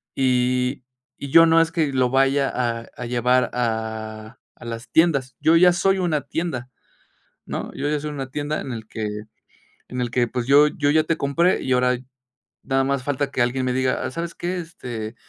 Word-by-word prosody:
y 125 0 +1 0.4
y 140 - -5
yo 165 +4 +8
no 165 0 +5
es 165 0 +2
que 160 -5 0
lo 130 -2 +2
vaya 135 +1 +2
a 115 -2 -2
a 125 - -6
llevar 125 +1 +2
a 110 -2 -4 0.2
a - - -14
las 115 +1 -7
tiendas. 140 -7 +2
Yo 160 +2 +4
ya 180 +1 +6
soy 195 +2 +2
una 165 -5 0
tienda, 150 -7 -4 0.8
¿no? - - -4
Yo 145 - -2
ya 150 0 0
soy 150 +1 -5
una 135 -2 -5
tienda 145 +2 -3
en 130 - -6
el 110 -2 -7
que 105 -1 -5 0.7
en 125 - -4
el 120 -1 -2
que, 120 0 +1
pues, 120 0 -3
yo 145 +3 +6
yo 145 -1 0
ya 155 +1 +3
te 165 - 0
compré, 170 +7 +1
y 130 - -1
ahora 125 0 +2 0.7
nada 135 0 +1
más 135 -1 -1
falta 140 0 -2
que 130 - -1
alguien 125 +2 0
me 125 - 0
diga: 130 0 0
"Ah, - - -3
¿sabes 170 +4 -5
qué?, 180 +1 -3
este, 120 -10 -7
130 Hz, 200 wpm, -22 LUFS, 125-150 Hz, 0.8 s, yo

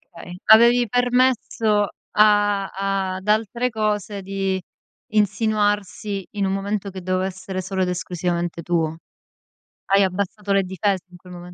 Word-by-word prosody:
Okay. 180 +1 -9
Avevi 235 +2 +6
permesso 245 -3 +2 0.3
a 205 -2 +4 0.5
ad 190 +2 -11
altre 225 +3 +1
cose, 210 -2 -2
di 195 -1 -2 0.5
insinuarsi, 205 -1 0
in 200 -2 -1
un 190 - 0
momento 200 0 -2
che 190 0 -8
doveva 185 +1 -1
essere 190 0 -5
solo 190 0 -3
ed 180 - +1
esclusivamente 175 -1 -2
tuo. 160 -1 -1 0.9
Hai 195 0 +4
abbassato 200 +2 -2
le 195 - +3
difese 190 0 -1
in 180 - -14
quel 180 0 -14
momen 175 0 -10
195 Hz, 135 wpm, -22 LUFS, 185-210 Hz, 0.9 s, Avevi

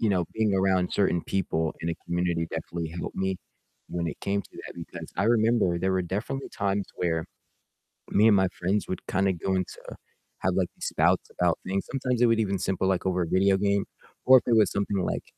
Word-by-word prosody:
you 110 - +2
know, 90 -3 +2
being 110 -2 +1
around 95 -1 +2
certain 85 -4 +2
people 80 -4 -1
in 85 - -3
a - - -2
community 85 -1 0
definitely 80 0 -4
helped 85 - -6
me 95 0 0 0.5
when 85 -1 -2
it 80 - -5
came 100 0 -1
to - - -20
that - - -9
because 85 -1 -8
I 95 - +1
remember 110 -6 +3
there 95 +2 0
were 95 - +1
definitely 105 +10 -4
times 100 0 -1
where 80 -2 0 0.9
me 105 +2 +5
and 105 - +6
my 95 -1 +4
friends 95 +4 -1
would 95 - -4
kind 95 +1 +1
of 90 - -2
go 95 +3 0
into 95 -1 -3 0.6
have, - - +1
like, - - +2
these - - -6
spouts - - +2
about 90 -2 +1
things, 95 +1 -1
sometimes 125 -3 -1
it 120 - +6
would 115 -1 +3
even 100 -3 0
simple, 95 0 0
like, 95 -1 0
over 90 -1 +1
a - - -4
video 95 +2 +3
game 100 0 +1 0.4
or 130 0 +9
if - - -16
it 120 - +4
was 110 -2 +5
something 100 0 -1
like, 95 - -1
95 Hz, 220 wpm, -27 LUFS, 90-100 Hz, 0.9 s, or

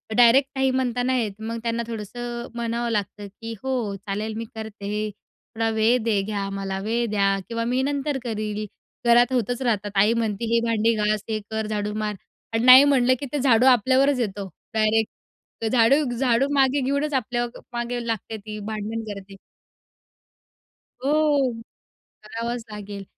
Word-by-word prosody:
Direct 245 +4 +6
नाही 265 0 +2
म्हणता 250 -1 0
नाही 255 -1 +1
येत. 210 -2 -4
मग 225 +1 -4
त्यांना 235 0 -1
थोडंसं 235 +2 -5
म्हणावं 235 0 -2
लागतं, 205 -1 -3
की 225 +3 -8
"हो 245 -6 -1
चालेल 205 +2 -4
मी 230 - -4
करते 220 -2 -7
हे, 210 +1 -2
थोडा 225 +2 -6
वेळ 230 +3 +4
दे 215 -3 +1
घ्या, 200 -1 -3
मला 195 -1 -3
वेळ 230 +4 -1
द्या 200 -1 +2
किंवा 230 0 -2
मी 250 +2 +1
नंतर 285 0 -1
करील," 215 -2 -3 0.4
घरात 240 +2 +5
होतच 245 +1 0
राहतात, 210 -5 0
आई 205 +3 +4
म्हणती 225 -1 -1
"हे 235 - +5
भांडी 230 0 +2
घास, 210 -1 0
हे 215 -1 -1
कर, 220 -1 -2
झाडू 210 -1 -2
मार" 215 0 -2 0.4
आणि 225 +1 +1
नाही 255 +2 +10
म्हणलं 260 -3 +4
की 285 - -4
ते 295 - 0
झाडू 250 -2 +4
आपल्यावरच 260 +3 +4
येतो, 200 -4 -3 0.3
डायरेक्ट. 220 0 +2 0.5
तर 225 - 0
झाडू 250 +5 +4
झाडू 255 +1 +2
मागे 275 0 +3
घेऊनच 280 +3 0
आपल्या 240 -2 0 0.3
मागे 240 0 -3
लागते 225 0 -3
ती 215 0 -8
भांडण 220 +1 -4
करते. 195 0 -11 1.7
हो, 290 -3 +2 0.7
करावाच 230 +2 -4
लागेल. 205 -1 -7
230 Hz, 160 wpm, -24 LUFS, 210-250 Hz, 1.7 s, नाही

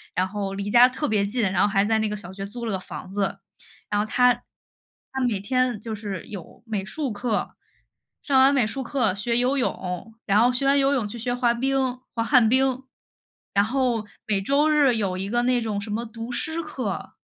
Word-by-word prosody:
然 185 +1 +1
后 200 0 -4
离 200 +1 -3
家 245 +2 +8
特 295 +4 -3
别 210 -5 +1
近， 230 +4 -1
然 185 0 +1
后 - - +5
还 200 -1 +2
在 220 +1 +2
那 220 -1 0
个 210 - -3
小 190 -2 -9
学 195 +1 -5
租 235 +3 -7
了 225 - -2
个 190 - -1
房 185 - -9
子， 195 0 -1 0.5
然 205 0 +1
后 - - -1
她 250 +2 +4
她 255 +2 -12
每 210 -4 -1
天 250 +2 0
就 225 0 -5
是 200 -4 -6
有 200 +2 -10
美 215 -4 -2
术 275 +5 -3
课， 215 +1 -2 0.7
上 270 -2 +3
完 270 +2 +6
美 260 -5 +3
术 270 +5 -4
课 245 -6 +1
学 235 +3 -1
游 255 +3 +2
泳， 190 -4 -3
然 205 +1 +4
后 245 +2 +5
学 250 +2 0
完 275 +1 +4
游 275 +1 +3
泳 255 -6 0
去 235 +3 -7
学 245 +2 -1
滑 245 -1 +2
冰， 260 0 0 0.2
滑 230 - +1
旱 230 0 +5
冰。 260 +1 +2 0.7
然 200 - +4
后 245 -2 0 0.2
每 205 -3 +1
周 280 +8 +2
日 290 -5 +4
有 200 -4 -1
一 190 +1 -3
个 240 +2 +1
那 250 0 +2
种 215 -3 -2
什 210 - -6
么 225 +3 -1
读 230 +1 -7
诗 320 +6 -1
课， 275 -4 -5
230 Hz, 235 characters per minute, -24 LUFS, 205-255 Hz, 0.7 s, 家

